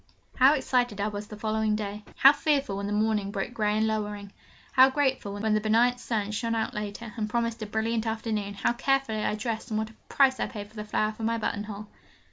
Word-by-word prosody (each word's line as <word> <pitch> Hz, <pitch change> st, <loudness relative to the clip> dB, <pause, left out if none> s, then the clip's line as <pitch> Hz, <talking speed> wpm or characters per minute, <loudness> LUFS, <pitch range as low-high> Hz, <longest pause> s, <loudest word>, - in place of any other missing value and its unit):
How 270 Hz, +4 st, +6 dB
excited 245 Hz, -6 st, 0 dB
I 205 Hz, +1 st, 0 dB
was 205 Hz, 0 st, -6 dB
the 210 Hz, -, -9 dB
following 215 Hz, 0 st, 0 dB
day: 210 Hz, 0 st, -4 dB
how 275 Hz, +2 st, +8 dB
fearful, 285 Hz, -8 st, 0 dB
when 200 Hz, 0 st, -3 dB
the -, -, -3 dB
morning 210 Hz, -1 st, +1 dB
broke 200 Hz, +3 st, -4 dB
grey 210 Hz, -2 st, +1 dB
and 220 Hz, -, +2 dB
lowering: 210 Hz, -2 st, -3 dB, 0.4 s
how 260 Hz, -1 st, +7 dB
grateful, 265 Hz, -7 st, 0 dB
when 210 Hz, +1 st, 0 dB
the 215 Hz, -, +2 dB
benignant 235 Hz, +3 st, +3 dB
sun 215 Hz, -4 st, -2 dB
shone 230 Hz, +2 st, -1 dB
out 225 Hz, -, -1 dB
later, 210 Hz, +1 st, -5 dB
and 215 Hz, -1 st, -2 dB
promised 230 Hz, 0 st, -1 dB
a 215 Hz, -, -4 dB
brilliant 220 Hz, +1 st, -1 dB
afternoon: 220 Hz, -2 st, -2 dB
how 200 Hz, -, +1 dB
carefully 240 Hz, -4 st, 0 dB
I -, -, 0 dB
dressed, 225 Hz, +2 st, -4 dB
and 215 Hz, -, -1 dB
what 220 Hz, 0 st, -2 dB
a -, -, -19 dB, 0.2 s
price 265 Hz, -2 st, +4 dB
I -, -, 0 dB
paid 205 Hz, -3 st, -7 dB
for -, -, -21 dB
the 210 Hz, -1 st, -5 dB
flower 215 Hz, 0 st, 0 dB
for 215 Hz, -, -12 dB
my 230 Hz, +1 st, 0 dB
buttonhole! 210 Hz, -1 st, -4 dB
220 Hz, 225 wpm, -27 LUFS, 210-235 Hz, 0.4 s, how